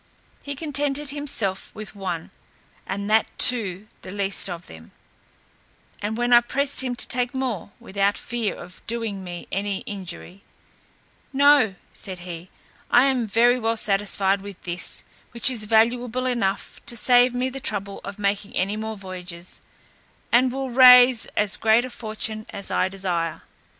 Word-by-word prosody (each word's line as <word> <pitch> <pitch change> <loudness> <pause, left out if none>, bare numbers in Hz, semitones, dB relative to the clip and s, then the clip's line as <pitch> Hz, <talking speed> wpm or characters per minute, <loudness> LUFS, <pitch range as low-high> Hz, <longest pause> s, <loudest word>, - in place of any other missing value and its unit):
He 285 0 -6
contented 290 -1 -1
himself 250 -10 -3
with 215 -1 -8
one, 185 -5 -5 0.6
and 200 +1 -4
that 220 0 +3
too 210 -5 +5
the - - -10
least 200 0 -1
of 175 -1 -7
them; 80 0 -13 1.1
and 210 +2 -3
when 240 0 +1
I 240 - +8
pressed 275 +3 0
him 255 -2 -2
to - - 0
take 245 0 0
more, 255 -8 -3
without 200 -3 -1
fear 235 -3 -3
of 180 +1 -12
doing 225 -4 -3
me 175 -1 -8
any 200 0 -2
injury, 185 -1 -8 0.9
"No," 280 -7 +4 0.2
said 185 -3 -7
he, 175 0 -8 0.4
"I 245 - +6
am 255 -4 +1
very 240 +4 +3
well 225 0 0
satisfied 195 -1 +2
with 200 -2 -11
this, 175 0 -2 0.3
which 235 +2 +5
is 225 -4 -1
valuable 235 +3 +2
enough 230 -6 -2
to 235 - 0
save 245 +1 +4
me 255 +1 0
the 270 +1 -7
trouble 200 -7 -4
of 200 0 -7
making 200 0 -2
any 195 +3 0
more 220 0 -5
voyages, 180 -2 -9 0.7
and 250 +1 +4
will 265 0 -4
raise 250 -1 +7
as 210 -1 +2
great 225 +2 +3
a 255 - -8
fortune 215 -1 -6
as 200 -1 -6
I 185 - +1
desire." 175 -4 -3
215 Hz, 155 wpm, -23 LUFS, 195-245 Hz, 1.1 s, I